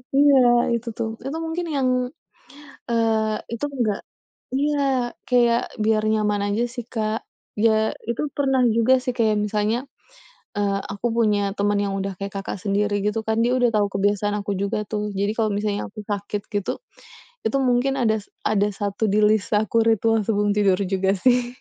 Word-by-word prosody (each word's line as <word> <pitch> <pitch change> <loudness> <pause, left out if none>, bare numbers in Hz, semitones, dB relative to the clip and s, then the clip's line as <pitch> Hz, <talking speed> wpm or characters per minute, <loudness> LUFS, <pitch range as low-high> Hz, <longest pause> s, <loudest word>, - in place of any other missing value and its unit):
Iya, 285 0 +6 0.4
itu 235 +1 -5
tuh. 225 - -1 0.2
Itu 280 +4 -3
mungkin 330 +2 -3
yang, 265 -2 +2 1.0
eee, 220 -2 +1 0.2
itu 235 +4 -3 0.2
nggak 215 -4 +1 0.6
iya, 290 +1 +1 0.5
kayak 240 -2 +4 0.2
biar 215 0 +2
nyaman 210 -1 +1
aja 210 +4 0
sih, 245 -2 -5
Kak. 220 -1 -1 0.4
Ya 220 -1 +3 0.2
itu 235 - -1
pernah 270 -2 +2
juga 230 +3 +4
sih 250 - -1
kayak 220 -2 +3
misalnya, 210 +2 0 0.8
eee, 200 -1 +1
aku 200 +4 -4
punya 210 -3 +3 0.2
teman 205 0 +1
yang 200 - -2
udah 195 0 -2
kayak 200 0 -5
Kakak 195 - -4
sendiri 205 0 +1
gitu 210 +1 0
kan, 220 0 0
dia 245 - +2
udah 245 -1 +4
tahu 205 -1 +3
kebiasaan 205 +1 +1
aku 200 0 -3
juga 205 +2 -1
tuh. 210 -1 -2 0.2
Jadi 200 +2 +1
kalau 220 -2 +1
misalnya 205 0 -1
aku 215 - -9
sakit 205 0 -3
gitu, 205 -2 -1 0.8
itu - - +1
mungkin 250 +2 +2
ada 220 -2 +3 0.3
ada 205 -1 +2
satu 205 +1 -1
di 210 - +3
list 215 -1 +1
aku 215 +1 0
ritual 225 0 +3
sebelum 205 -2 +1
tidur 195 -3 +3
juga 190 0 +2
sih. 245 -1 +3
215 Hz, 165 wpm, -23 LUFS, 205-235 Hz, 1.0 s, Iya